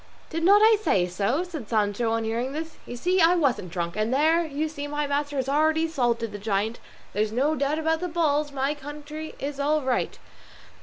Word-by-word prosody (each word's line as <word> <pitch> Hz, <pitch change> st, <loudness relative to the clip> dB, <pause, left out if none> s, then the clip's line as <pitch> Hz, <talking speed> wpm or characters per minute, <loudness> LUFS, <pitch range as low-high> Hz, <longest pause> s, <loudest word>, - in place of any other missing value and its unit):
"Did 330 Hz, 0 st, -2 dB
not 405 Hz, +4 st, +6 dB
I 440 Hz, 0 st, +7 dB
say 190 Hz, -, +2 dB
so?" 200 Hz, -, 0 dB
said 315 Hz, -, -7 dB
Sancho 215 Hz, +1 st, +1 dB
on 225 Hz, 0 st, 0 dB
hearing 235 Hz, +4 st, -2 dB
this. 320 Hz, +1 st, -6 dB
"You 245 Hz, -, -6 dB
see 365 Hz, +8 st, +2 dB
I 335 Hz, +2 st, +6 dB
wasn't 265 Hz, -, 0 dB
drunk; 170 Hz, -1 st, -3 dB
there 285 Hz, -, +2 dB
you 310 Hz, 0 st, -2 dB
see 290 Hz, -2 st, -6 dB
my 295 Hz, 0 st, -2 dB
master 285 Hz, 0 st, -1 dB
has 265 Hz, -1 st, -1 dB
already 315 Hz, +3 st, +2 dB
salted 240 Hz, -7 st, 0 dB
the 205 Hz, -, -7 dB
giant; 210 Hz, +2 st, -1 dB, 0.3 s
there's 210 Hz, +1 st, 0 dB
no 270 Hz, +7 st, +1 dB
doubt 290 Hz, 0 st, 0 dB
about 320 Hz, 0 st, +1 dB
the 360 Hz, -, -2 dB
bulls; 305 Hz, -3 st, +1 dB
my 275 Hz, +1 st, 0 dB
county 300 Hz, +2 st, -8 dB
is 280 Hz, 0 st, -4 dB
all 300 Hz, +1 st, +1 dB
right!" 260 Hz, -1 st, -1 dB
285 Hz, 200 wpm, -25 LUFS, 230-315 Hz, 0.3 s, I